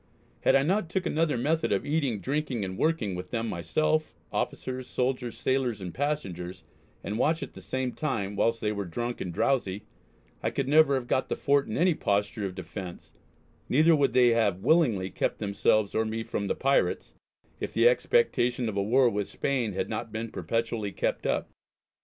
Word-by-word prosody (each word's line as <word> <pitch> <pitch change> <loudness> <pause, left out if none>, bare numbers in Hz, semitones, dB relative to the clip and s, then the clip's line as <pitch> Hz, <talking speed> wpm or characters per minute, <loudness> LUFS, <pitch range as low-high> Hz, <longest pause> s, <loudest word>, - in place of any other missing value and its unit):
Had - - +3
I 135 - +5
not 180 +2 +1
took 185 +1 -1
another 155 -4 +1
method 155 +7 0
of 100 - +1
eating, 145 -7 0
drinking, 135 -6 -1
and 95 0 -5
working 140 - 0
with 90 0 -6
them 115 -1 -2
myself, 155 - 0 0.2
officers, 130 0 -3
soldiers, 125 -1 -2
sailors 130 -5 0
and 90 -3 -6
passengers, 95 - -3 0.4
and 105 +3 -3
watch 160 +2 +2
at - - -8
the - - -11
same 130 -1 -2
time, 115 -11 -2
whilst 115 +3 +1
they 105 - 0
were 100 -2 -3
drunk 120 +8 -4
and 90 - -3
drowsy, 105 -1 0 0.6
I - - 0
could - - -2
never 150 -1 +5
have 130 -2 -2
got 130 - 0
the - - 0
Fort 140 -1 +2
in 110 - -3
any 180 +2 +4
posture 100 -4 -1
of 90 - -8
defence, 90 0 -8 0.6
neither 160 +5 +5
would 140 -5 +2
they 125 -1 +6
[have] 100 -5 +1
willingly 120 - +3
kept - - -1
themselves 100 0 +1
or 110 - +2
me 110 +1 -3
from 100 -2 -3
the - - 0
pirates, 135 +1 +1 0.5
if - - -4
the - - +4
expectation 130 - +2
of 110 - -3
a - - +2
war 125 +6 +4
with 105 -3 -1
Spain 125 -7 -1
had - - -2
not 115 -1 -4
been 110 +1 -4
perpetually 110 +3 -2
kept - - -1
up. - - -1
120 Hz, 190 wpm, -28 LUFS, 100-140 Hz, 0.6 s, they